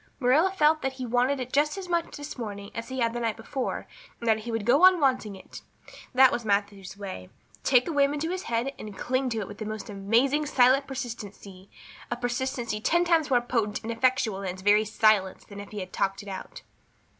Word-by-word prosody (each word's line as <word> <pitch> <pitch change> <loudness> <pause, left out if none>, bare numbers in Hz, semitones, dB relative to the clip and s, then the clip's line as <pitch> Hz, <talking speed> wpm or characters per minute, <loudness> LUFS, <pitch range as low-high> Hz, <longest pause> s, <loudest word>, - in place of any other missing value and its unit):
Marilla 285 +8 +4
felt 310 -4 +3
that 265 0 -2
he 260 -1 -6
wanted 250 +3 +1
it 255 0 -6
just 300 +5 +2
as 380 -2 -6
much 340 -1 -1
this 290 0 -7
morning 205 -4 -6
as 230 +2 -6
he 260 -1 -3
had 230 -1 +1
the 240 - -3
night 230 -2 -1
before, 265 -2 -4 0.3
and 235 - -6
that 220 -1 +3
he 235 +2 -6
would 225 -2 -2
go 270 +8 +4
on 370 -1 +8
wanting 255 -8 +1
it. 190 - -12 0.5
That 260 0 +7
was 240 - -2
Matthew's 200 -2 -2
way 190 - -7 0.3
take 250 -2 +4
a - - -1
whim 280 -1 +3
into 320 +3 -2
his 370 0 -3
head 235 +4 -1
and 210 -2 -8
cling 255 +5 -1
to 225 -2 -2
it 195 - -5
with 205 - -10
the 215 - -4
most 215 0 -6
amazing 240 +10 +1
silent 265 +1 +4
persistency 205 -7 -8 0.4
a 240 - -1
persistency 245 -2 -3
ten 345 +8 +2
times 330 -3 +2
more 245 -2 +3
potent 230 -4 -1
and 225 - -3
effectual 230 -4 +1
in 195 - -3
its 185 +1 -7
very 210 +2 +4
silence 215 -3 +2
than 200 -1 -10
if 205 - -9
he 210 -2 -6
had 185 0 -8
talked 195 +1 -1
it - - -14
out. 195 - -8
240 Hz, 225 wpm, -27 LUFS, 205-270 Hz, 0.5 s, on